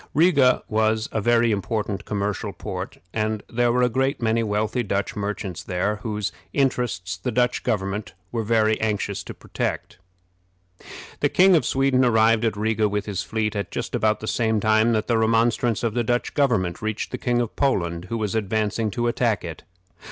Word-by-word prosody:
Riga 145 Hz, -6 st, +4 dB
was 110 Hz, 0 st, +1 dB
a 110 Hz, -, -1 dB
very 120 Hz, +1 st, +3 dB
important 105 Hz, -1 st, -2 dB
commercial 100 Hz, -1 st, -2 dB
port, -, -, -6 dB, 0.2 s
and 110 Hz, -1 st, -1 dB
there 120 Hz, 0 st, +1 dB
were 125 Hz, +1 st, +2 dB
a -, -, +5 dB
great 135 Hz, +4 st, 0 dB
many 115 Hz, 0 st, +1 dB
wealthy 110 Hz, +2 st, 0 dB
Dutch 100 Hz, -3 st, -2 dB
merchants 100 Hz, -4 st, -4 dB
there, 95 Hz, +4 st, -1 dB
whose 105 Hz, -1 st, -3 dB, 0.2 s
interests 120 Hz, -10 st, 0 dB
the 95 Hz, +7 st, -3 dB
Dutch 125 Hz, +1 st, +1 dB
government 95 Hz, -2 st, -2 dB, 0.2 s
were 115 Hz, -, -1 dB
very 110 Hz, 0 st, +2 dB
anxious 105 Hz, -2 st, -1 dB
to -, -, -8 dB
protect. -, -, -4 dB, 1.2 s
The -, -, +2 dB
King 185 Hz, 0 st, +5 dB
of 160 Hz, -, +2 dB
Sweden 135 Hz, -1 st, +2 dB
arrived 115 Hz, -1 st, +4 dB
at 110 Hz, -2 st, 0 dB
Riga 110 Hz, 0 st, +1 dB
with 105 Hz, 0 st, -2 dB
his 100 Hz, -3 st, -3 dB
fleet 110 Hz, -1 st, -2 dB
at 100 Hz, -, -3 dB
just -, -, -5 dB
about 110 Hz, 0 st, +1 dB
the 110 Hz, -, -5 dB
same 110 Hz, -2 st, +1 dB
time 110 Hz, +2 st, +3 dB
that 110 Hz, -1 st, 0 dB
the 115 Hz, -2 st, +1 dB
remonstrance 115 Hz, 0 st, +2 dB
of 115 Hz, -2 st, 0 dB
the 120 Hz, 0 st, 0 dB
Dutch 120 Hz, +2 st, -1 dB
government 115 Hz, -, +1 dB
reached 110 Hz, -1 st, -3 dB
the -, -, -4 dB
King 120 Hz, -1 st, +1 dB
of 120 Hz, -2 st, -2 dB
Poland, 85 Hz, -10 st, 0 dB
who 115 Hz, +5 st, -3 dB
was 105 Hz, -2 st, -2 dB
advancing 110 Hz, +1 st, 0 dB
to 120 Hz, +3 st, -1 dB
attack 115 Hz, -5 st, 0 dB
it. -, -, -7 dB
110 Hz, 180 wpm, -23 LUFS, 105-120 Hz, 1.2 s, a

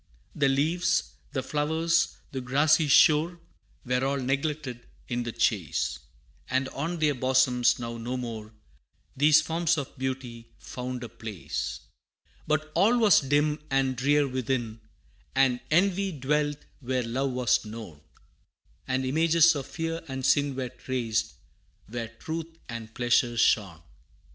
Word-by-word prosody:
The 140 Hz, -2 st, +2 dB
leaves, 165 Hz, +5 st, +1 dB, 0.2 s
the 130 Hz, -, -2 dB
flowers, 160 Hz, +4 st, 0 dB
the 135 Hz, -2 st, -4 dB
grassy 145 Hz, +5 st, +3 dB
shore, 160 Hz, +4 st, +5 dB, 0.5 s
Were 125 Hz, +1 st, 0 dB
all 140 Hz, +1 st, 0 dB
neglected 135 Hz, -1 st, -2 dB, 0.2 s
in 120 Hz, -1 st, -2 dB
the 120 Hz, -1 st, -4 dB
chase, 80 Hz, -, 0 dB, 0.5 s
And 130 Hz, +1 st, +1 dB
on 165 Hz, +5 st, -3 dB
their 155 Hz, -2 st, +2 dB
bosoms 130 Hz, -1 st, +3 dB
now 115 Hz, -1 st, -5 dB
no 125 Hz, +3 st, -3 dB
more 110 Hz, -3 st, -6 dB, 0.6 s
These 150 Hz, +3 st, +5 dB
forms 165 Hz, +1 st, +1 dB
of 140 Hz, -3 st, -5 dB
beauty 130 Hz, -3 st, -5 dB
found 125 Hz, 0 st, -6 dB
a 120 Hz, -, -6 dB
place. 105 Hz, -, -5 dB, 0.7 s
But 155 Hz, 0 st, 0 dB
all 210 Hz, +8 st, +4 dB
was 220 Hz, -4 st, +6 dB
dim 145 Hz, +2 st, +1 dB
and 135 Hz, -1 st, +1 dB
drear 145 Hz, +3 st, +2 dB
within, 125 Hz, -3 st, -2 dB, 0.5 s
And 130 Hz, -2 st, +3 dB
envy 195 Hz, +4 st, +2 dB
dwelt 145 Hz, 0 st, 0 dB, 0.2 s
where 130 Hz, -1 st, -1 dB
love 130 Hz, +3 st, -2 dB
was 125 Hz, -3 st, +2 dB
known, 105 Hz, -9 st, -9 dB, 0.9 s
And 130 Hz, 0 st, 0 dB
images 165 Hz, +4 st, +4 dB
of 140 Hz, -3 st, -5 dB
fear 165 Hz, 0 st, -4 dB
and 130 Hz, -1 st, -4 dB
sin 145 Hz, 0 st, +2 dB
Were 130 Hz, -1 st, -3 dB
traced, 120 Hz, -3 st, -2 dB, 0.5 s
where 115 Hz, +1 st, -4 dB
truth 160 Hz, +8 st, -7 dB
and 115 Hz, -2 st, -7 dB
pleasure 120 Hz, 0 st, +2 dB
shone. 95 Hz, -7 st, +2 dB
130 Hz, 135 wpm, -27 LUFS, 120-150 Hz, 0.9 s, was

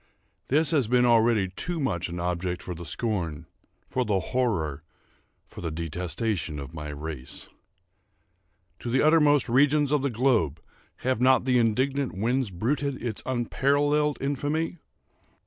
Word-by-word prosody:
This 150 Hz, +2 st, +3 dB
has 140 Hz, -8 st, +2 dB
been 125 Hz, +1 st, +3 dB
already 115 Hz, -4 st, +4 dB
too 170 Hz, -, -4 dB
much 95 Hz, -, -1 dB
an 85 Hz, +1 st, -5 dB
object 90 Hz, 0 st, -2 dB
for 90 Hz, -, -5 dB
the 85 Hz, 0 st, -8 dB
scorn—for 85 Hz, -, -3 dB
the 105 Hz, -4 st, +1 dB
horror—for 85 Hz, -, -4 dB
the 85 Hz, -, -2 dB
detestation 85 Hz, +2 st, -3 dB
of 70 Hz, +2 st, -7 dB
my 75 Hz, -2 st, -6 dB
race. 75 Hz, -3 st, -6 dB, 1.3 s
To 120 Hz, -, -5 dB
the 130 Hz, +3 st, +2 dB
uttermost 150 Hz, -3 st, +4 dB
regions 145 Hz, +3 st, +3 dB
of 150 Hz, -2 st, +2 dB
the 140 Hz, -, 0 dB
globe 115 Hz, -, +1 dB, 0.5 s
have 130 Hz, -2 st, +1 dB
not 130 Hz, 0 st, +4 dB
the 125 Hz, -2 st, +3 dB
indignant 130 Hz, +1 st, 0 dB
winds 120 Hz, +3 st, 0 dB
bruited 130 Hz, +9 st, -1 dB
its 115 Hz, -3 st, -4 dB
unparalleled 145 Hz, +4 st, +1 dB
infamy? 145 Hz, +5 st, -2 dB
120 Hz, 130 wpm, -26 LUFS, 85-135 Hz, 1.3 s, already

